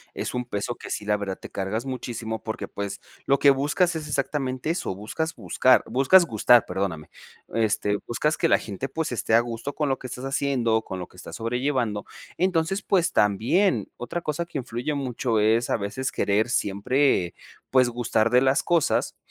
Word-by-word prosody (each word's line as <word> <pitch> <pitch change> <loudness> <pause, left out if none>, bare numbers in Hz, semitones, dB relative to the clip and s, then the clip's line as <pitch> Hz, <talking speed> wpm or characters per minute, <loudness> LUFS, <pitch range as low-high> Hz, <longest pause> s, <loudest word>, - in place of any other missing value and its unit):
Es - - -4
un 125 0 -2
peso 120 +1 -3
que - - -10
sí 105 - -3
la 105 0 +2
verdad 100 -2 -4
te - - -10
cargas 105 +6 -3
muchísimo, 115 -4 -4
porque 110 - -4
pues 100 -1 -5 0.3
lo 140 - +4
que 140 - +6
buscas 150 +6 +1
es 155 -1 -4
exactamente 140 0 -1
eso, 130 - -3
buscas 160 +11 -4
buscar, 130 0 +3
buscas 135 +9 +5
gustar, 120 -2 +4
perdóname, 90 -4 -3 0.4
este, 105 -2 +1
buscas 150 +6 0
que - - +1
la - - +5
gente 110 +6 -5
pues 160 0 -3
esté 115 -1 +1
a - - +7
gusto 120 +4 -5
con 150 -2 0
lo 135 - 0
que 130 - -7
estás 125 +2 -7
haciendo, 135 -5 +1
con 95 -4 -6
lo 90 - -6
que - - -21
estás - - -9
sobrellevando. 120 -2 -1 0.4
Entonces 185 +1 +1
pues 180 -4 +1
también 115 - +2
otra 170 +8 -4
cosa 155 +2 -2
que 155 - -5
influye 125 +3 -3
mucho 125 -4 -1
es, 110 +3 +2
a - - +2
veces, 115 +6 -3
querer 105 +4 +1
siempre 100 - +1 0.3
pues 130 -2 +4
gustar 115 -2 0
de 125 0 +5
las 135 +3 +3
cosas. 170 -3 +1
125 Hz, 185 wpm, -25 LUFS, 110-140 Hz, 0.4 s, a